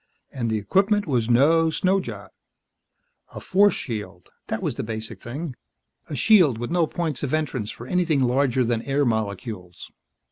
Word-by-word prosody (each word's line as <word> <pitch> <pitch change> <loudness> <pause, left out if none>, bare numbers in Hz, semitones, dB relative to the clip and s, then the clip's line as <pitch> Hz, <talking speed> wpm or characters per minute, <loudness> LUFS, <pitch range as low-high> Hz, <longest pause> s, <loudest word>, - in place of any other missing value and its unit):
And 120 -4 -2
the 110 - 0
equipment 195 - +2
was 125 -6 0
no 160 +7 +4
snow 185 +4 +1
job. 105 - -8 1.0
A - - -5
force 200 0 +3
shield, 105 -7 -6 0.2
that - - -3
was - - -1
the - - -4
basic 110 -2 -6
thing. 140 +3 -6 0.5
A 150 - -4
shield 165 - +5
with 120 +1 -5
no 170 -2 +2
points 160 -6 -3
of 145 +1 0
entrance 135 -9 -2
for 120 - -8
anything 165 -2 +1
larger 130 0 +2
than 115 -1 0
air 140 +3 0
molecules. 105 -5 -4
130 Hz, 165 wpm, -24 LUFS, 110-165 Hz, 1.0 s, shield